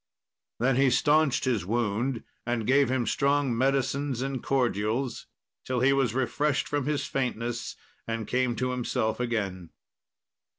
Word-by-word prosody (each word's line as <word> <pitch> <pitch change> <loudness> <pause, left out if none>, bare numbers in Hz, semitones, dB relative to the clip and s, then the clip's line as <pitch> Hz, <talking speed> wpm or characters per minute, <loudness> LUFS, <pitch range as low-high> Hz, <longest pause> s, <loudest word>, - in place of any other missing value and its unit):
Then 125 +1 +2
he 135 0 +5
staunched 145 +1 +3
his 120 -8 +1
wound, 115 +4 -1 0.2
and 120 -2 -2
gave 135 +1 +4
him 130 -2 0
strong 140 -2 +1
medicines 135 +1 0
and 135 -2 -3
cordials 120 -1 -1 0.4
till 125 -1 -1
he 135 +2 +5
was 130 -4 +1
refreshed 140 +2 0
from 145 -2 -1
his 150 -1 0
faintness 120 -3 -3 0.3
and 115 -1 -2
came 125 -1 +1
to 125 +1 -1
himself 120 -3 -1
again. 100 -8 -2
125 Hz, 135 wpm, -27 LUFS, 115-135 Hz, 0.4 s, he